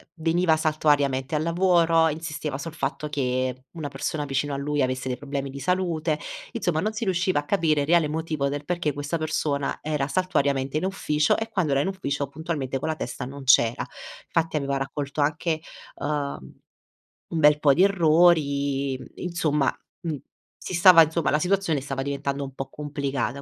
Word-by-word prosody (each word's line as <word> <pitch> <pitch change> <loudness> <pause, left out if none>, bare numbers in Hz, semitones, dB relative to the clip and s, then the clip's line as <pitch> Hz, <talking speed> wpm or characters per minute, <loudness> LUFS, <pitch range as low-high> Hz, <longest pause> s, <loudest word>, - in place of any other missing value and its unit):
veniva 165 0 +2
saltuariamente 145 -3 +1
al 150 - +1
lavoro, 170 -1 +3
insisteva 150 -3 -4
sul 160 +2 -6
fatto 150 0 -3
che 130 -2 -1
una 160 -4 -5
persona 145 +2 -3
vicino 140 +1 -1
a - - -2
lui 145 0 -1
avesse 130 0 -1
dei 125 - -2
problemi 140 -1 -4
di 140 - -7
salute, 165 -2 0 0.3
insomma 175 -9 -1
non 215 +2 -1
si 220 - -4
riusciva 185 -2 +1
a 145 - -6
capire 155 -5 +2
il 140 - -2
reale 170 -2 +4
motivo 155 -3 -1
del 145 +1 -4
perché 170 -5 -1
questa 145 +4 -3
persona 150 -3 -1
era 150 -2 -1
saltuariamente 140 -5 0
in 180 - -1
ufficio 150 -6 +1
e 225 0 -3
quando 180 -9 0
era 140 - +3
in - - -1
ufficio 145 -7 -2
puntualmente 140 -3 -3
con 160 - -3
la 155 - 0
testa 125 -3 -5
non 140 +1 -8
c'era, 120 -2 +4 0.5
fatti 165 -1 +1
aveva 140 -1 -1
raccolto 140 +1 -3
anche, 155 +2 0 0.3
uhm, 145 - -3 0.8
un 165 - -2
bel 150 -1 +6
po' 140 -2 +5
di 180 - +5
errori, 155 -7 +3
mhmm, - - -10
insomma, 155 -6 0 0.3
mhmm, 160 -4 -3 0.4
si - - -6
stava 175 -1 +8
insomma, 160 0 0
la 150 - +2
situazione 180 -3 +1
stava 135 -1 -4
diventando 140 0 -2
un 135 - -7
po' 135 0 -6
complicata, 140 -1 -3
150 Hz, 175 wpm, -25 LUFS, 140-165 Hz, 0.8 s, stava